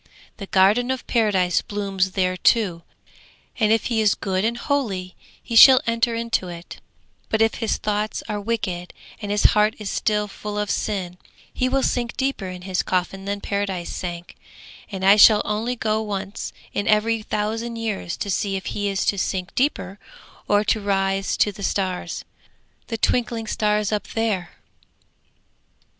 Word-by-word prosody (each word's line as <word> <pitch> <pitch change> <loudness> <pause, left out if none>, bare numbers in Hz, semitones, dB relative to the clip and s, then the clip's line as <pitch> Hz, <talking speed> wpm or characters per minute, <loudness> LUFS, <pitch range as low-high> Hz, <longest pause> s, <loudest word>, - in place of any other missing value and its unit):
The 195 - -7
Garden 205 +7 +3
of 260 -1 -2
Paradise 195 -7 +2
blooms 195 -2 -2
there 185 -1 +1
too, 185 -3 +2 0.8
and 215 -2 +3
if 225 - +3
he 230 -3 +1
is 210 -1 +3
good 190 -1 -2
and 230 +2 0
holy 205 -10 -2 0.3
he 230 - -5
shall 260 +3 +10
enter 230 0 +1
into 230 -5 -1
it; 170 0 -9 0.5
but 220 - +1
if 225 0 +3
his 225 - 0
thoughts 210 0 -2
are 210 -1 -3
wicked 200 -5 -3 0.3
and 205 - -5
his 205 0 +1
heart 210 +1 +3
still 210 +1 0
full 210 +1 -6
of 210 -1 -1
sin, 180 -4 -3 0.3
he 255 - 0
will 270 0 +1
sink 240 -1 -1
deeper 265 -7 -1
in 180 0 -8
his 185 -1 -1
coffin 190 +1 -2
than 200 0 -3
Paradise 195 -3 -3
sank, 175 -1 -6 0.5
and 190 -1 -3
I 200 +2 +7
shall 210 0 +7
only 220 +4 -1
go 220 -2 0
once 200 -1 -4 0.2
in 205 - -2
every 220 +1 +2
thousand 220 +3 -3
years 220 -6 -3
to 200 - -3
see 195 +1 -1
if 190 - -4
he 205 0 -2
is 195 -1 -1
to 200 - +1
sink 185 -1 -2
deeper 205 -8 -1 0.5
or 205 0 +3
to 215 0 +1
rise 195 -1 0
to 205 - +3
the 200 - -12
stars, 190 -2 -2 0.6
the 225 - -3
twinkling 235 0 0
stars 210 -1 0
up 210 -2 -2
there.' 210 -6 -1
210 Hz, 165 wpm, -22 LUFS, 190-225 Hz, 0.8 s, shall